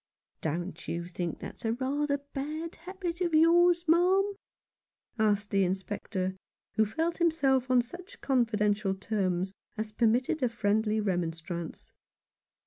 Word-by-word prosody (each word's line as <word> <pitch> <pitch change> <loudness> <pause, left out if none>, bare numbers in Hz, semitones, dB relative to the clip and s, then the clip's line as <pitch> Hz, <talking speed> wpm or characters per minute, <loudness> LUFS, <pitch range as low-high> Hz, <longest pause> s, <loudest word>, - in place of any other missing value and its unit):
" - - -54
Don't 170 +2 -3
you 170 0 -3
think 175 -2 -3
that's - - -9
rather 265 +6 0
a 280 0 -8
bad 310 +4 -4
habit 360 0 -5
of 340 -3 +1
yours, 345 +2 +5
ma'am? 370 +5 +4 0.4
" 235 - -34
asked 205 0 -1
the 195 -1 +3
Inspector, 190 0 -2 0.4
who 220 - +3
felt 325 +10 -1
himself 275 -7 +2
on 250 -1 +5
such 350 +10 -11
confidential 210 -6 +1
terms 190 -2 -1 0.2
as 215 0 -3
permitted 240 +6 +2
a 250 - +3
friendly 220 -1 +1
remonstrance. 170 -3 -3
230 Hz, 135 wpm, -30 LUFS, 195-320 Hz, 0.4 s, yours